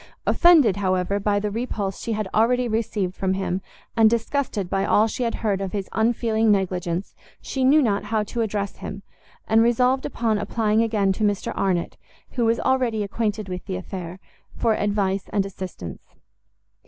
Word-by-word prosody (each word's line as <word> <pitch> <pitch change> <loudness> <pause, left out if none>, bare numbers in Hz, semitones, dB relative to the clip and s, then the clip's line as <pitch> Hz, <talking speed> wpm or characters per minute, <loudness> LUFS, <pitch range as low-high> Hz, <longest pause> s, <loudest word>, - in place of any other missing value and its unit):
Offended, 305 - +5
however, 185 0 0
by 205 0 +1
the 210 0 -2
repulse 205 -4 -3
she 230 - -2
had 215 -2 -2
already 245 +3 +3
received 215 -4 -1
from 190 0 -1
him, 190 -1 -2 0.3
and 225 -1 +6
disgusted 230 -3 -1
by 195 +2 0
all 210 - +4
she 250 +4 -4
had 235 -2 0
heard 200 -2 +1
of 195 -2 -4
his 200 -2 -3
unfeeling 225 0 +2
negligence, 185 -2 -1 0.3
she 265 - -3
knew 285 +3 +5
not 205 -3 0
how 215 0 0
to 230 +3 -3
address 205 -3 -2
him, 200 0 -7 0.4
and 220 +1 +4
resolved 250 +3 +3
upon 220 -3 0
applying 215 +1 +1
again 210 -4 +1
to 215 - -3
Mr 205 -2 0
Arnott, 180 -3 -1 0.3
who 240 -3 0
was 230 +1 +2
already 250 -5 +1
acquainted 210 0 -2
with 180 -1 -5
the 190 - -3
affair, 180 -1 -6 0.4
for 230 -2 +2
advice 200 -2 0
and 200 -2 +1
assistance. 185 - -7
210 Hz, 170 wpm, -23 LUFS, 195-230 Hz, 0.4 s, and